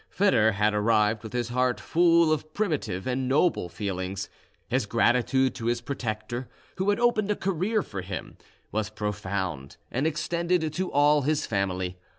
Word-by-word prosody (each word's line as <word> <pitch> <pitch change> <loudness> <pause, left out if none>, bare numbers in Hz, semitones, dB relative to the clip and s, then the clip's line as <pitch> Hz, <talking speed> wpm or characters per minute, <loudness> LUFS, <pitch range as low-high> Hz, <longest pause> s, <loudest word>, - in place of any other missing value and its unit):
Foedor 110 - +3
had 105 +2 +2
arrived 105 0 +2
with 110 - -8
his 120 -1 -2
heart 125 -1 +1
full 170 -1 +4
of 155 0 -5
primitive 145 - -1
and 130 0 -1
noble 145 - +2
feelings; 95 +1 -4 0.4
his - - 0
gratitude 130 +2 +2
to 115 - -5
his 120 0 +1
protector, 120 -1 -4 0.3
who 190 +2 0
had 205 - +2
opened 235 -4 +2
a 210 - +2
career 195 +4 0
for 95 -3 -6
him, 90 +1 -6 0.4
was 110 0 -1
profound, 100 -9 -4
and 135 +6 0
extended 160 +1 0
to 185 +3 -2
all 145 +1 +4
his 150 +2 0
family. 95 -3 -2
125 Hz, 160 wpm, -27 LUFS, 105-160 Hz, 0.4 s, full